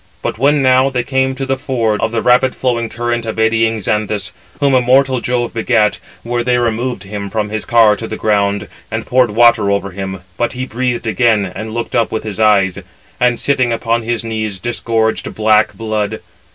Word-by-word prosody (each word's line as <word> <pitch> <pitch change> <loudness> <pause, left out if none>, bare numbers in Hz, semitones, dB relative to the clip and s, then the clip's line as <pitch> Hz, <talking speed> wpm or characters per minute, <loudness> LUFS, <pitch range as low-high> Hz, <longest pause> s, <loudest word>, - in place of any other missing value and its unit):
But - - -3
when 140 +2 +3
now 130 +1 +4
they 125 -2 -1
came 130 +1 0
to 135 +1 -4
the 135 0 0
ford 120 -6 -1
of 110 - 0
the 115 -1 -1
rapid 125 +1 +3
flowing 115 -3 -1
current 120 0 -2
of 110 - -4
eddying 110 0 +2
Xanthus, 105 0 -2 0.3
whom 140 -2 +2
immortal 130 0 +3
Jove 120 -1 -1
begat, 115 -2 +1 0.3
there 120 0 -1
they 125 0 +2
removed 120 +1 -1
him 100 0 -6
from 105 0 -2
his 110 0 -4
car 115 -3 +5
to 115 - -6
the 110 - -5
ground, 100 -1 0 0.2
and 110 0 -4
poured 125 -1 +3
water 115 -1 +4
over 100 -1 -1
him; 95 0 -6 0.2
but 120 0 -1
he 130 0 -4
breathed 125 -1 -2
again, 110 -1 +2
and 110 0 -6
looked 115 - -3
up 115 - +1
with 110 - -3
his 110 -1 -6
eyes; 100 -4 +3 0.4
and, 120 -1 +2
sitting 130 -4 +1
upon 115 0 0
his 115 0 -2
knees, 110 -3 -3
disgorged 115 0 -1
black 110 0 +2
blood. 110 -1 -2
115 Hz, 190 wpm, -16 LUFS, 110-125 Hz, 0.4 s, car